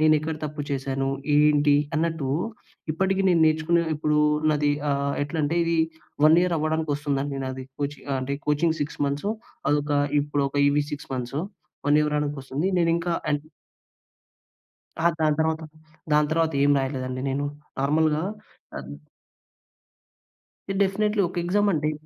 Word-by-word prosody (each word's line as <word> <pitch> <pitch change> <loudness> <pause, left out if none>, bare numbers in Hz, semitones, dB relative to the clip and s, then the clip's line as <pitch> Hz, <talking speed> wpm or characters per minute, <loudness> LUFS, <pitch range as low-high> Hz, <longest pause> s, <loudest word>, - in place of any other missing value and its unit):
నేనెక్కడ 155 0 +3
తప్పు 150 0 -4
చేశాను? 135 0 -1 0.3
ఏంటి? 150 -1 +5 0.2
అన్నట్టు, 160 -4 -1 0.6
ఇప్పటికి 190 +3 +1
నేను 170 -2 +4
నేర్చుకునే 160 +2 +2
ఇప్పుడు 150 0 +1 0.3
నాది 145 0 +2 0.2
ఆహ్, 140 0 0
ఎట్లంటే 155 +2 -1
ఇది 165 0 +1 0.5
1 160 +2 +7
ఇయర్ 180 -2 +1
అవ్వడానికొస్తుందండి 145 -3 -1
నాది. 130 0 -5 0.2
కోచి 145 0 -3
ఆహ్, 135 - +1
అంటే 135 +2 -2
కోచింగ్ 160 +2 +2
6 145 - -3
మంత్సు. 145 +10 -1 0.4
అదొక 145 0 +1 0.3
ఇప్పుడొక 145 -1 -1
ఇవి 145 +1 +2
6 145 0 -6
మంత్సు. 125 +4 -3 0.5
1 145 - +5
ఇవు 150 - +1
రావడానికొస్తుంది. 145 +1 -2
నేనింకా 170 0 +1 0.2
అంట్ 145 0 0 1.6
అహ! 170 - +4
దాని 155 -1 +3
తర్వాత 160 0 +1 0.5
దాని 150 0 +4
తర్వాతేం 155 -3 +2
రాయలేదండి 130 -1 -3
నేను. 140 +2 -1 0.4
నార్మల్‌గా 150 +2 +2 0.6
అం - - -7 2.0
డెఫినిట్‌లీ 210 +2 +1
ఒక 175 - -8
ఎగ్జామ్ 205 +3 +2
అండి. 155 0 0
150 Hz, 125 wpm, -25 LUFS, 140-160 Hz, 2.0 s, 1